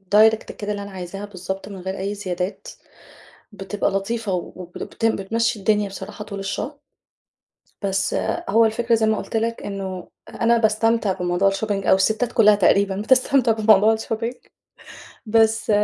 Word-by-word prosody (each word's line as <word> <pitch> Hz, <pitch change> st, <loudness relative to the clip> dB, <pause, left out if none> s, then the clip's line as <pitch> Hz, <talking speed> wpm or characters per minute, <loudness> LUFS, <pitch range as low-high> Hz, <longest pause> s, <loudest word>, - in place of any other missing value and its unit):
direct 220 Hz, +1 st, +7 dB, 0.2 s
كده 210 Hz, 0 st, -5 dB
اللي 205 Hz, -1 st, -4 dB
أنا 200 Hz, -, -9 dB
عايزاها 190 Hz, +2 st, -7 dB
بالضبط 190 Hz, 0 st, -6 dB
من 200 Hz, -, -8 dB
غير 190 Hz, +2 st, -5 dB
أي 200 Hz, +2 st, -3 dB
زيادات، 185 Hz, -, -4 dB, 0.9 s
بتبقى 200 Hz, 0 st, -2 dB
لطيفة 200 Hz, +1 st, -2 dB
وب 180 Hz, 0 st, -6 dB
لبتم 225 Hz, -1 st, -1 dB
بتمشّي 225 Hz, +3 st, -1 dB
الدنيا 205 Hz, 0 st, +1 dB
بصراحة 195 Hz, +2 st, -8 dB
طول 200 Hz, -2 st, -7 dB
الشهر. 195 Hz, +9 st, -4 dB, 1.0 s
بس 195 Hz, -1 st, 0 dB, 0.4 s
هو 225 Hz, +3 st, +5 dB
الفكرة 230 Hz, +1 st, +1 dB
زي 220 Hz, -1 st, +1 dB
ما 220 Hz, 0 st, +2 dB
قُلت -, -, -3 dB
لك 230 Hz, +1 st, -2 dB
إنه 190 Hz, -2 st, -5 dB, 0.2 s
أ -, -, -6 dB
أنا 235 Hz, +1 st, +4 dB
باستمتع 225 Hz, -1 st, +2 dB
بموضوع 180 Hz, +2 st, 0 dB
الشوبينج 195 Hz, 0 st, -1 dB
أو -, -, +6 dB
الستات 220 Hz, +5 st, +1 dB
كلّها 210 Hz, -3 st, +5 dB
تقريبًا 200 Hz, 0 st, +3 dB
بتستمتع 255 Hz, +1 st, +3 dB
بموضوع 215 Hz, -1 st, +5 dB
الشوبينج 225 Hz, +2 st, -3 dB, 0.9 s
بس 225 Hz, 0 st, +2 dB
210 Hz, 150 wpm, -22 LUFS, 195-225 Hz, 1.0 s, direct